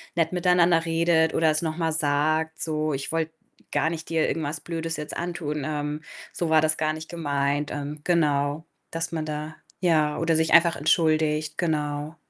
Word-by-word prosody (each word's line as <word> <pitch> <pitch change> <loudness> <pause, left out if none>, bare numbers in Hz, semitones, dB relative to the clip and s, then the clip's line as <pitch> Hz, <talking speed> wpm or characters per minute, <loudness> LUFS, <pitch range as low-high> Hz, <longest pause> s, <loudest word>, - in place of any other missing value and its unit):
nett 165 0 +1
miteinander 175 -2 +3
redet 165 -1 +2
oder 160 -1 +3
es 155 - 0
noch 160 -1 -3
mal 165 -2 0
sagt, 155 +1 0
so: 155 -1 -1
„Ich 135 0 -4
wollte 165 -1 -1 0.4
gar 145 +2 +1
nicht 165 -1 -6
dir 160 -1 +1
irgendwas 155 -1 -2
Blödes 165 -1 -4
jetzt 150 0 -6
antun. 165 -4 -3
Ähm, 150 0 -3 0.3
so 170 - -2
war 160 0 +5
das 155 0 +2
gar 155 0 +1
nicht 155 +1 -8
gemeint.“ 145 -3 -1
Ähm, 145 +1 -5
genau, 150 -2 +1 0.3
dass 165 0 -3
man 160 -1 -2
da 155 +1 -5 0.3
ja 155 -4 +2
oder 165 0 +2
sich 160 0 +1
einfach 170 0 +6
entschuldigt, 155 0 +1
genau. 150 -2 -2
155 Hz, 175 wpm, -25 LUFS, 150-165 Hz, 0.4 s, einfach